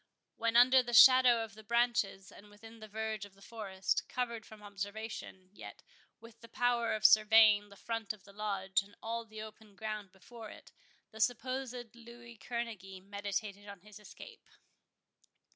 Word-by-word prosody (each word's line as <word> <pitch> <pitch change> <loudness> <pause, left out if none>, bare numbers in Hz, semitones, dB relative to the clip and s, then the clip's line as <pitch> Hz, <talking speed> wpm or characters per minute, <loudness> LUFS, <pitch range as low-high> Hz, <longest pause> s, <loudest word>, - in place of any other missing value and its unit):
When 230 0 -1
under 255 +2 +7
the 240 -1 -3
shadow 255 -2 +8
of 220 -3 -9
the 220 +1 -14
branches, 235 -4 0
and 205 +1 -15
within 225 +2 -15
the 215 - -10
verge 220 -1 -4
of 200 -1 -12
the 195 - -22
forest, 195 -4 -3
covered 235 -3 -4
from 215 -1 -14
observation, 200 -2 -7
yet - - -12 0.4
with 230 0 -16
the 230 - -14
power 235 -1 0
of 215 - -5
surveying 215 -1 +6
the 200 - -15
front 225 0 -4
of 210 -3 -11
the 200 - -17
Lodge, 195 -2 -1
and 205 +1 -18
all 230 +1 -4
the 215 -1 -9
open 215 -1 -14
ground 215 -1 -6
before 220 +4 -12
it, - - -14 0.4
the 220 - -12
supposed 250 0 -2
Louis 235 0 -13
Kerneguy 215 -5 -6
meditated 200 0 -5
on 200 -3 -10
his 210 +2 -14
escape. 445 - -14
220 Hz, 165 wpm, -33 LUFS, 205-235 Hz, 0.4 s, shadow